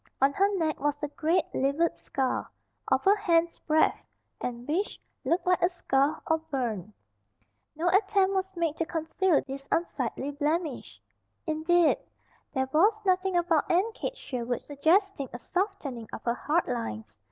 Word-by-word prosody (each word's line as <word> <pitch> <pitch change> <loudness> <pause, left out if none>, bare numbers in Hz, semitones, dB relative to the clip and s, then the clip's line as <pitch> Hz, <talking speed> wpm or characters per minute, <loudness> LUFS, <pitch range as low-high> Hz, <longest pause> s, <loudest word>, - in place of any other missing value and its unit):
On 275 +1 +4
her 395 +5 +3
neck 315 -3 0
was 290 0 0
a - - +1
great, 325 +3 +1
livid 280 +5 +1
scar, 265 -2 -2 0.4
of - - +1
a 395 +2 +6
hand's 340 -5 +1
breadth, 315 0 +2 0.4
and 240 0 -4
which 355 +8 -1 0.2
looked 340 +3 +1
like 360 0 +3
a 350 - +4
scald, 290 -4 +1
or 320 0 +2
burn. 240 - -3 0.8
No 330 +3 -1
attempt 390 +1 +3
was 380 0 -2
made 330 -3 0
to 330 - 0
conceal 325 +1 +1
this 275 0 -7
unsightly 290 -4 -1
blemish. 300 0 -2 0.5
Indeed, 325 +3 +3 0.5
there 265 -2 0
was 410 +8 +4
nothing 370 -1 +2
about 340 -3 +2
Aunt 385 +6 +2
Kate - - -4
Sherwood 245 - -3
suggesting 320 - +1
a - - -4
softening 305 - -3
of - - -7
her 235 - +1
hard 310 +7 0
lines. 230 - -4
320 Hz, 155 wpm, -28 LUFS, 275-365 Hz, 0.8 s, a